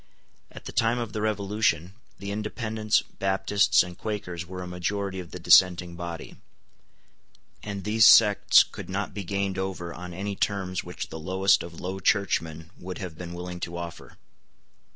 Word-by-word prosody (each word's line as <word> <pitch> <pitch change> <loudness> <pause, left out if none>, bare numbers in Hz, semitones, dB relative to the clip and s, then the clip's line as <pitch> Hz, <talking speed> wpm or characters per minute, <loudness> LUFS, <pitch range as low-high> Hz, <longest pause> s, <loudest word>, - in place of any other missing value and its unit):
At - - -12
the - - -6
time 115 +2 +2
of 115 -4 -4
the 105 - -3
Revolution, 100 -4 0 0.2
the 100 0 -6
Independents, 110 0 -1
Baptists, 95 0 +2
and 90 0 -9
Quakers 90 -4 -5
were 90 0 -6
a - - -7
majority 95 +2 -3
of 90 -2 -8
the - - -7
dissenting 90 -2 +5
body; 85 -1 -7 1.2
and 100 -2 -6
these 110 +2 +5
sects 105 -3 +7
could - - -10
not 100 +2 -3
be 100 - -5
gained 100 +1 -2
over 95 -3 -4
on 90 0 -8
any 100 +3 -4
terms 95 -3 -1
which - - -7
the 80 - -7
lowest 95 +4 +2
of 85 -1 -9
Low 95 +1 -4
Churchmen 80 -5 0
would 90 +1 -6
have 90 -5 -6
been 85 +1 -8
willing 90 0 -6
to 85 0 -5
offer. 85 -1 -8
95 Hz, 165 wpm, -26 LUFS, 90-100 Hz, 1.2 s, sects